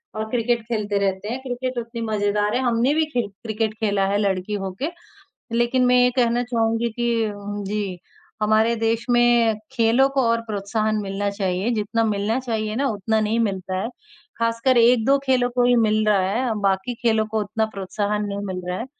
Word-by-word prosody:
और 220 0 -3
क्रिकेट 235 0 0
खेलते 210 -3 -1
रहते 195 +1 -1
हैं। 245 +3 -3
क्रिकेट 255 0 -4
उतनी 230 0 -5
मजेदार 210 0 0
है, 255 - +1
हमने 245 +2 +2
भी 315 +1 +2
खेल 240 -4 0 0.2
क्रिकेट 220 -1 -1
खेला 200 -3 +1
है 200 +1 +1
लड़की 195 -1 -1
होके। 190 - -3 0.7
लेकिन 240 +2 +2
मैं 250 0 +4
ये 250 - +4
कहना 240 -1 +2
चाहूँगी 230 -1 0
कि 240 +2 -1 0.2
उम, 205 0 -6
जी, 200 -2 -3 0.4
हमारे 220 +2 +3
देश 225 0 0
में 240 -2 +4 0.2
खेलों 230 +4 +3
को 275 0 +1
और 230 0 +1
प्रोत्साहन 215 +1 -1
मिलना 200 0 -2
चाहिए। 195 0 -1
जितना 225 +1 0
मिलना 215 +2 0
चाहिए 220 -4 -3
ना 275 +3 +1
उतना 220 +1 0
नहीं 215 +2 0
मिलता 190 -4 -1
है, 225 - -3 0.5
खासकर 230 +2 +1
1-2 240 +3 +5
खेलों 255 -2 +2
को 245 - +3
ही 245 0 +4
मिल 215 -2 +2
रहा 210 -2 +4
है, 240 +2 0
बाकी 195 +4 0
खेलों 220 -2 +2
को 220 0 -1
उतना 215 +2 -1
प्रोत्साहन 205 +2 -2
नहीं 200 0 -4
मिल 185 -2 -4
रहा 180 0 -2
है 230 - -4
220 Hz, 185 wpm, -22 LUFS, 205-240 Hz, 0.7 s, 1-2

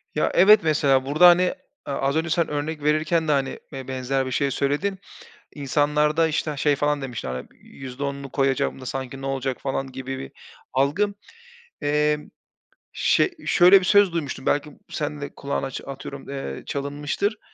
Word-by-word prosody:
Ya, 150 - +1
evet 210 +4 +7
mesela 140 -4 +2
burada 155 +6 +6
hani, 175 +1 +7
eee, 180 - +1 0.4
az 135 +2 0
önce 160 +1 0
sen 170 +1 +1
örnek 150 +1 -3
verirken 155 +2 +1
de - - +2
hani 135 -2 0
be 135 -1 -7
benzer 130 +1 -1
bir 130 - -5
şey 140 +1 0
söyledin. 150 +9 -1 0.6
İnsanlarda 150 +3 +2
işte 155 -1 -2
şey 145 +1 +2
falan 145 +1 0
demiştin, 125 - -5
hani, 65 0 -5 0.2
"%10'unu 140 +1 -6
koyacağım 135 -1 0
da - - -9
sanki 135 +1 -5
ne - - -6
olacak?" 135 -1 -2
falan 135 -1 -3
gibi 130 0 -5
bir 65 - -8 0.4
algı. 150 +11 +1 0.7
Emm, 150 +1 0 0.6
şe 380 - +2
şöyle 180 +3 +7
bir 185 - -4
söz 205 -2 +5
duymuştum, 145 -5 -4
belki 145 +1 0
b - - -18
sen 150 -1 -4
de 140 - -7
kulağını 140 -1 -3
aç 135 - -6
atıyorum, 135 0 -8
eee, 135 - -5
çalınmıştır. 145 +9 -2
145 Hz, 170 wpm, -24 LUFS, 135-155 Hz, 0.7 s, evet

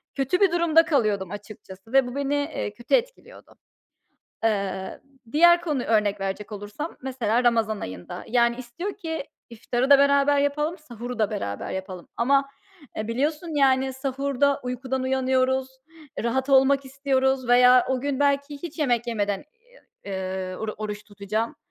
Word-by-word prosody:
Kötü 275 +7 0
bir 390 -3 +5
durumda 335 -1 +4
kalıyordum 210 - 0
açıkçası 205 0 -11
ve 270 -2 +5
bu 245 - -7
beni, 280 0 -1
eee, 285 -7 -3
kötü 240 +3 -7
etkiliyordu. - - -5 0.9
Eee, 200 -3 -1 0.3
diğer 345 +4 +6
konuyu 300 -7 -2
örnek 210 -2 +2
verecek 195 +2 -4
olursam 210 +10 -6
mesela 250 -3 0
Ramazan 225 -3 +2
ayında. 90 -1 -7
Yani, 235 0 +2
istiyor 255 +11 -6
ki 320 -6 -4 0.3
iftarı 240 +3 -2
da 280 - +9
beraber 280 0 +4
yapalım, 295 +4 0
sahuru 245 -5 -8
da 215 -2 +2
beraber 100 - -4
yapalım 185 -2 -6
ama, 275 +3 +2 0.5
eee, 215 - -3
biliyorsun, 300 +8 -1
yani, 265 -1 +3
sahurda 275 +1 0
uykudan 255 +1 -3
uyanıyoruz, 260 0 +1 0.6
rahat 260 +3 -1
olmak 275 +1 +4
istiyoruz 265 -1 0
veya 250 0 +6
o 260 -1 0
gün 280 -1 -2
belki 285 0 +1
hiç 335 -1 -7
yemek 245 -5 +1
yemeden, 205 -1 -2 0.6
ııı, 190 -1 -4
oru 220 -1 -3
oruç 210 -1 -5
tutacağım. 215 +6 -3
255 Hz, 145 wpm, -25 LUFS, 215-280 Hz, 0.9 s, da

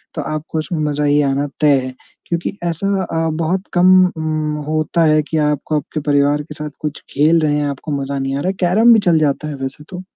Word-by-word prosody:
तो 155 - -2
आपको 155 +2 -4
उसमें 160 +1 -3
मज़ा 145 +1 -2
ही 145 0 +3
आना 140 +2 -1
तय 145 -2 +5
है 130 - -6 0.3
क्योंकि 170 +3 -3
ऐसा 170 +3 -2 0.2
अ, 165 -2 -1
बहुत 175 +3 0
कम 180 0 +4 0.3
उम, 155 -1 -2
होता 155 +2 0
है 155 0 +4
कि 160 - -1
आपको 150 +1 -1
आपके 150 +1 -4
परिवार 145 0 +2
के 150 - -10
साथ 150 0 -6
कुछ 150 -1 -5
खेल 155 +3 +3
रहे 150 -1 +1
हैं, 150 0 0
आपको 140 +3 -6
मज़ा 140 0 -3
नहीं 135 0 -2
आ - - -2
रहा 180 - -2
है। - - -1
कैरम 215 +7 +5
भी 220 - +5
चल 165 -2 +4
जाता 150 0 0
है 150 - -5
वैसे 135 +3 -7
तो। 180 -1 -7
155 Hz, 230 wpm, -18 LUFS, 145-165 Hz, 0.3 s, तय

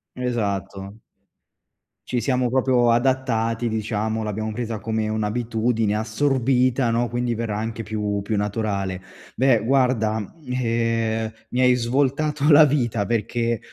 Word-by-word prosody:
Esatto. 100 -4 -3 1.1
Ci 125 -2 -1
siamo 125 0 0
proprio 125 -2 +3
adattati, 120 -2 +1
diciamo, 110 0 -2
l'abbiamo 110 +1 -3
presa 115 -1 -4
come 110 +1 -2
un'abitudine 110 0 0
assorbita, 125 +1 +1
no, 120 0 0
quindi 120 0 -1
verrà 110 -2 -3
anche 115 +1 -4
più 105 -1 -2
più 105 +1 -2
naturale. 100 -3 -2 0.3
Beh, 125 -4 +3
guarda, 125 -4 +2 0.3
ehm, 115 -2 -1 0.2
mi 125 - 0
hai 125 0 +5
svoltato 140 +5 +1
la 150 +2 +9
vita, 120 -7 0
perché, 115 0 -1
115 Hz, 120 wpm, -23 LUFS, 110-125 Hz, 1.1 s, la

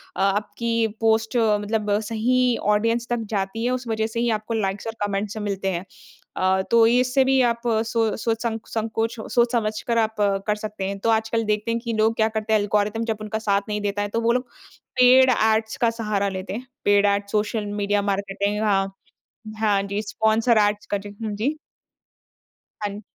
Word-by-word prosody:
अ, - - -2
आपकी 215 +3 0
पोस्ट 225 +1 +2
मतलब 210 -1 +1
सही 250 +2 +2 0.2
ऑडियंस 230 +2 0
तक 240 -1 0 0.2
जाती 195 +4 -2
है 250 - +1
उस 250 -1 -3
वजह 220 0 0
से 230 +1 -4
ही 240 0 +1
आपको 220 +2 -6
लाइक्स 200 0 -2
और 225 - -3
कमेंट्स 200 +1 -3
मिलते 200 -2 -3
हैं। 175 +2 -4 0.5
अ, 190 0 +2
तो 230 -1 +6
इससे 250 +2 +3
भी 265 0 +3
आप 235 -1 +1 0.2
सो 225 -2 0
सोच 225 0 -1
संक 225 -1 -3
संकोच 225 +1 -2 0.2
सोच 240 0 +3
समझ 215 -3 -1
कर 235 -1 +1
आप 220 -1 +1 0.3
कर 210 - +2
सकते 210 -2 -6
हैं। 200 0 -3
तो 230 - 0
आजकल 225 +1 +1
देखते 210 +2 0
हैं 230 - 0
कि 235 -1 -3
लोग 220 +1 +2
क्या 220 0 +2
करते 220 0 -2
हैं 215 - +5
एल्गोरिथम 210 +2 0
जब 220 -2 -2
उनका 215 +1 -3
साथ 200 -2 +1
नहीं 210 0 -2
देता 205 0 -1
है 205 - -1
तो 230 +2 -1
वो 230 +1 +2
लोग 250 +1 -1 0.5
पेड़ 255 +1 +7
ऐड्स 220 -1 +1
का 235 - +4
सहारा 205 -2 0
लेते 190 0 -5
हैं। 245 +4 -6 0.2
पेड़ 205 0 +4
ऐड 200 0 +1
सोशल 210 0 0
मीडिया 205 0 0
मार्केटिंग 200 +1 -2
हाँ, 195 -2 +1 0.7
हाँ, 205 -2 +2
जी, 200 +2 -3
स्पॉन्सर 220 +2 +2
ऐड्स 205 0 -5
का 205 - +1
जी, 205 +1 -9
हाँ 215 -1 -2
जी। 270 +9 -1 1.3
हाँ। 205 0 -4
220 Hz, 195 wpm, -23 LUFS, 205-230 Hz, 1.3 s, पेड़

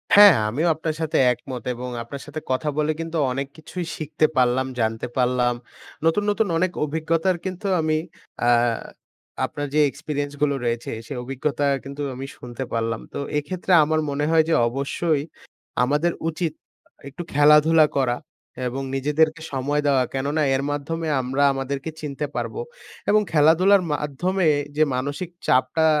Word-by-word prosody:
হ্যা, 205 - +10 0.3
আমিও 150 +10 0
আপনার 160 0 -3
সাথে 160 - 0 0.2
একমত। 125 +1 -8
এবং 125 +1 -5
আপনার 140 +4 -8
সাথে 150 +1 -6
কথা 140 +4 0
বলে 155 0 +2
কিন্তু 165 0 -3
অনেক 135 +2 -2
কিছুই 170 +3 -6
শিখতে 155 0 0
পারলাম, 125 +1 +3
জানতে 110 +1 -1
পারলাম। 125 -1 +2 0.5
নতুন, 165 +6 +3
নতুন, 205 0 +1
অনেক 185 +1 +1
অভিজ্ঞতার 165 +4 0
কিন্তু 190 +2 -4
আমি 155 0 +1 0.5
আ - - +3 1.0
আপনার 145 0 -4
যে 155 - +3
experiences 145 0 -4
গুলো 140 -1 +2
রয়েছে। 120 0 -2 0.2
সেই 140 - -5
অভিজ্ঞতা 140 +3 -2 0.2
কিন্তু 140 +1 -7
আমি 135 +2 -6
শুনতে 125 +1 -6
পারলাম। 115 0 -1
তো - - -4 0.2
এক্ষেত্রে 175 +6 -3
আমার 155 +1 +1
মনে 140 +1 -1
হয় 160 -1 +5
যে - - +3
অবশ্যই 140 +4 -1 0.6
আমাদের 150 +6 +2 0.2
উচিত 165 -1 -2 0.6
একটু 140 - -8
খেলাধুলা 150 +2 +6
করা 125 -2 +1 0.5
এবং 130 +2 -3
নিজেদেরকে 155 +4 +1
সময় 145 +3 0
দেওয়া 135 -2 +4
কেননা 140 +3 -1
এর 135 - 0
মাধ্যমে 160 +3 -3
আমরা 135 +3 0
আমাদেরকে 135 +2 -3
চিনতে 150 -1 -3
পারবো। 460 - -3 0.5
এবং 215 +1 +5
খেলাধুলার 170 +6 +5
মাধ্যমে 160 +5 0 0.3
যে 155 - +5
মানসিক 145 +7 -3 0.2
চাপটা 130 +5 +3
145 Hz, 150 wpm, -23 LUFS, 135-160 Hz, 1.0 s, হ্যা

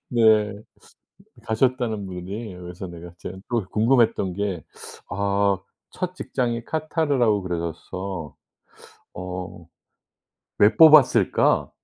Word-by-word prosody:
네. 110 -3 +4 0.9
가셨다는 115 -2 0
분이 95 +3 -7
그래서 90 +1 -8
내가 85 0 -10
제가 95 - -7
또 115 -5 0
궁금했던 115 -4 +2
게 95 -4 -3 0.5
아 100 -1 +1 0.3
첫 180 0 -4
직장이 120 -8 -2
카타르라고 145 -8 0
그러셔서. 85 -1 -5 0.8
'어 90 -2 -7 0.9
왜 105 +2 +5
뽑았을까? 145 - +5
100 Hz, 205 characters per minute, -23 LUFS, 90-120 Hz, 0.9 s, 왜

